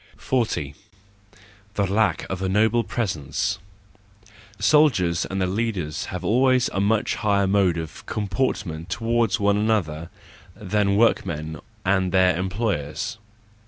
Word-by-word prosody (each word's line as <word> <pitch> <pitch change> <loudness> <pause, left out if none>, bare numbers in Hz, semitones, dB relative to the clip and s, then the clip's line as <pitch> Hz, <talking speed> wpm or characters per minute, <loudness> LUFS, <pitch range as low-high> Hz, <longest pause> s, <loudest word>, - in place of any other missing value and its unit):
40. 110 - -1 1.0
The 100 - +1
Lack 105 +4 +1
of 95 -1 -4
a 95 - 0
noble 110 +4 +3
Presence. 95 - -2 1.0
—Soldiers 100 - +3
and 95 - -4
their 95 - +1
leaders 95 -7 -2
have 90 - -6
always 130 +2 +3
a 95 - -1
much 105 +2 +1
higher 100 -2 +2
mode 95 -3 +2
of 80 -2 -6
com¬ 105 -1 -3
portment 90 -8 -2
toward 115 +2 0
one 100 +1 +2
another 90 -7 0 0.5
than 105 -1 0
workmen 80 -8 +1 0.3
and 95 -1 +2
their 95 -2 +4
employers. 95 0 -2
100 Hz, 125 wpm, -23 LUFS, 90-110 Hz, 1.0 s, their